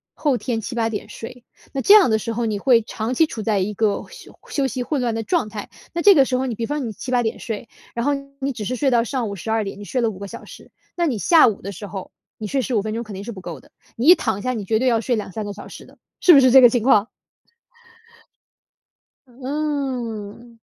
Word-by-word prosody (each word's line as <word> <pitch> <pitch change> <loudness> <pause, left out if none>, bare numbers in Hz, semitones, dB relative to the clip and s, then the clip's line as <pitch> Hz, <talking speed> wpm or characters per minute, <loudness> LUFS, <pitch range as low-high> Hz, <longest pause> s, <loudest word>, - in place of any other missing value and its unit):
后 285 -4 +1
天 235 -3 -2
7、8 230 0 -2
点 210 - -5
睡， 245 +2 -10 0.3
那 270 - -2
这 400 - +6
样 415 - +7
的 220 - +2
时 230 +2 -4
候 230 +1 -1
你 210 -2 -2
会 240 -2 +4
长 220 +2 -4
期 320 - +4
处 235 -8 -6
在 210 -2 +1
一 205 +3 -1
个 210 0 0
休 - - -14
休 275 -2 0
息 255 -1 -3
混 285 +2 -2
乱 235 -2 -1
的 225 - -2
状 335 -2 0
态。 205 -1 -7 0.2
那 340 - -1
这 400 +2 +8
个 275 -3 +6
时 255 - -1
候， 260 - -1
你 235 - -3
比 230 - -3
方 290 -1 -3
你 - - -4
7、8 250 +2 -1
点 225 -1 -2
睡， 220 +1 -6 0.3
然 235 +2 -2
后 290 - +2 0.3
你 275 - -1
只 225 -5 -6
是 255 - -2
睡 270 +1 +1
到 235 -1 +3
上 245 -3 -2
午 200 - -5
12 220 +4 -1
点， 195 0 -7
你 205 - -8
睡 255 - -1
了 230 - +2
5 190 - -11
个 200 - -6
小 - - -9
时， - - -14 0.3
那 345 -1 +2
你 245 -7 -1
下 325 - +6
午 220 - -2
的 200 - -6
时 200 +2 -8
候， 190 -2 -7 0.3
你 215 - -5
睡 270 +4 0
15 235 -4 0
分 215 +1 -4
钟 235 - -3
肯 215 -3 -10
定 195 - -7
是 235 - -6
不 195 - -9
够 175 -2 -8
的， - - -23 0.2
你 240 +5 -1
一 355 - +10
躺 220 - -2
下 255 - -1
你 215 -4 -4
绝 220 +3 +1
对 255 - +1
要 230 -2 +2
睡 240 +2 0
2、3 210 0 -5
个 205 - -5
小 205 - -10
时 - - -11
的， - - -20 0.2
是 360 - +7
不 285 - +9
是 255 - +5
这 265 - +9
个 245 - +10
情 235 -1 0
况？ 225 -4 +4 2.2
嗯。 250 -5 -4
235 Hz, 265 characters per minute, -21 LUFS, 215-260 Hz, 2.2 s, 一